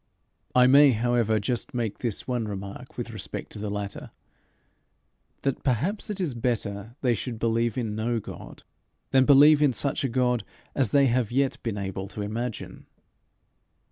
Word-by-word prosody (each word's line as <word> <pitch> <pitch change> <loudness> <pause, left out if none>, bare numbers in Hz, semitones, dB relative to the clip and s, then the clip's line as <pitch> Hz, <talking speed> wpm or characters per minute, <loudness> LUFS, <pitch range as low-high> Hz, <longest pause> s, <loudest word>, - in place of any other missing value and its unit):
I 125 0 +7
may, 140 +1 +7
however, 115 -1 +1
just 120 +4 -2
make 115 -4 -2
this 115 -5 -4
one 120 -3 -1
remark 100 -1 -7
with - - -4
respect - - -6
to - - -7
the 105 0 -3
latter 100 -1 -5 1.3
that 135 -2 -1
perhaps 150 - -1
it 205 -2 -3
is 170 -8 -1
better 115 -2 -3
they 125 -3 +2
should 115 +2 -4
believe 115 0 0
in 110 -4 -2
no 115 +2 -1
God - - -10 0.5
than 130 -1 +5
believe 145 +2 +7
in 145 -4 +4
such 140 +3 0
a 135 - 0
God 125 -1 +1 0.3
as 130 -6 +1
they 140 +5 +4
have 120 -3 +1
yet 135 +1 0
been 115 -4 -3
able 95 -1 -4
to 105 +1 -6
imagine. 115 +3 -5
120 Hz, 165 wpm, -26 LUFS, 105-130 Hz, 1.3 s, I